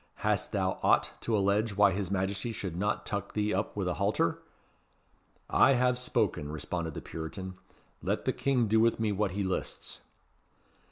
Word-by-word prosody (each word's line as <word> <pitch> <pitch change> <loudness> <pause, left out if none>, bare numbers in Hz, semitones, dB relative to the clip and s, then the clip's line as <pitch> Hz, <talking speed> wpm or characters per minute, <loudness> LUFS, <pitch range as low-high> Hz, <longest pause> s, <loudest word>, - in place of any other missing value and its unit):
Hast - - +1
thou - - 0
aught - - +3
to 115 -2 +1
allege 100 +1 +1
why 100 -1 +6
his 95 -1 -2
Majesty 95 +3 -1
should 95 -6 -5
not 105 +4 -1
tuck 100 -1 -3
thee 105 0 0
up 100 +3 -1
with 95 -3 -1
a 90 - +1
halter?" 100 -4 +1 1.1
"I 135 - +5
have 125 0 +2
spoken," 75 -11 0
responded 80 0 -3
the - - -5
Puritan; 95 +4 -6 0.5
"let - - -1
the - - +2
King 130 -4 +1
do 110 +2 +4
with 115 0 +3
me 110 -2 +1
what 100 -1 0
he 100 +1 -1
lists." 95 -1 -3
100 Hz, 170 wpm, -30 LUFS, 95-110 Hz, 1.1 s, why